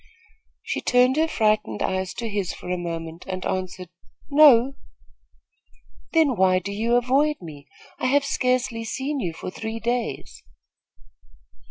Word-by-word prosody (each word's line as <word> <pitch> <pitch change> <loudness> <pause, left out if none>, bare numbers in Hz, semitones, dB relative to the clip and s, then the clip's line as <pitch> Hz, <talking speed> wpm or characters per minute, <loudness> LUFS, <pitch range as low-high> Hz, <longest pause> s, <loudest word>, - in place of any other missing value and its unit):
She - - -3
turned 250 +1 +3
her 320 +1 +3
frightened 215 - 0
eyes 190 0 -2
to 235 - -4
his 200 -4 -2
for 180 - -7
a - - +1
moment 165 -1 -6
and 185 -1 -4
answered: 185 -1 -4 0.4
"No." 275 -3 +6 1.4
"Then 315 -6 +3
why 185 -1 +3
do 190 +2 -4
you 225 +4 0
avoid 270 +5 +2
me? 150 -4 -11 0.3
I - - 0
have 280 +2 +3
scarcely 250 -4 0
seen 270 +5 -3
you 180 -8 -2
for 165 +3 -7
three 220 +3 -5
days." 225 - -3
225 Hz, 140 wpm, -24 LUFS, 185-255 Hz, 1.4 s, No